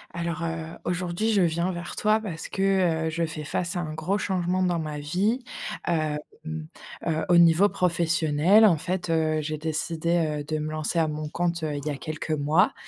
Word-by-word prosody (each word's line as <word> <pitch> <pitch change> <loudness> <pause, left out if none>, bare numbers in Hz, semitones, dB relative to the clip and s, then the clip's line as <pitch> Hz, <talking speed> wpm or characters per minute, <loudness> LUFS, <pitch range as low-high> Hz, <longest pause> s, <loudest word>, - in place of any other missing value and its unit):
Alors, 170 -1 -3
heu, 165 0 -4
aujourd'hui, 180 +4 -1
je 200 - +4
viens 170 +2 +1
vers 175 0 -6
toi 215 +1 +3
parce 175 -7 -5
que, 185 -5 +1
heu, - - 0
je 165 +1 -1
fais 155 -1 -6
face 170 +4 -2
à - - 0
un 155 -3 -4
gros 185 +6 -1
changement 185 -2 0
dans 180 -2 +2
ma 155 -2 -4
vie. 190 - 0 0.5
Hem, 155 -3 0 0.9
heu, 160 -1 0
au 175 - +6
niveau 170 +3 +6
professionnel 170 +2 +3
en 175 -7 +5
fait, 180 +2 -3
heu, 155 -1 +1
j'ai 155 +1 -3
décidé, 160 0 -1
heu, - - -5
de 155 +1 -2
me 155 0 -3
lancer 155 +2 -1
à 160 - +3
mon 150 0 -4
compte, 170 0 -1
heu, 155 -1 -1
il 145 0 -5
y - - +1
a 145 - -3
quelques 155 +2 -6
mois 155 +4 +3
165 Hz, 200 wpm, -26 LUFS, 155-180 Hz, 0.9 s, au